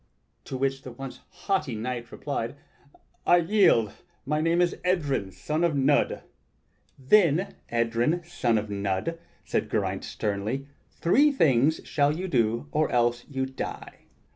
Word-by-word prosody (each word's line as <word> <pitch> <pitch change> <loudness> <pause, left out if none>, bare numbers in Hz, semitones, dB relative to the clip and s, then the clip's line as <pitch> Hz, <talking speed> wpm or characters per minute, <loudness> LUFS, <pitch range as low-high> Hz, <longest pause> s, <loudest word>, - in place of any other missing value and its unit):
To 130 - -5
which 135 +1 -1
the 130 - -9
once 135 +2 -8
haughty 180 - -2
knight 120 +1 -4
replied: 140 -3 -4 0.7
"I 175 - +7
yield! 170 - +3 0.3
My 150 +3 0
name 165 +2 +2
is 175 -1 +2
Edryn, 145 - 0
son 150 - -2
of 170 -3 +2
Nudd." 140 +1 +2 0.7
"Then 175 +5 +3 0.2
Edryn, 120 +8 +1
son 125 -10 0
of 105 0 -2
Nudd," 100 +12 -2 0.3
said - - -1
Geraint - - -1
sternly, 105 +6 -3 0.2
"three 285 - +3
things 155 - +3
shall 145 0 +1
you 185 +2 -3
do, 115 -3 +1
or 155 0 +1
else 120 0 +1
you 135 -2 -1
die. 130 0 -7
135 Hz, 140 wpm, -27 LUFS, 120-165 Hz, 0.7 s, I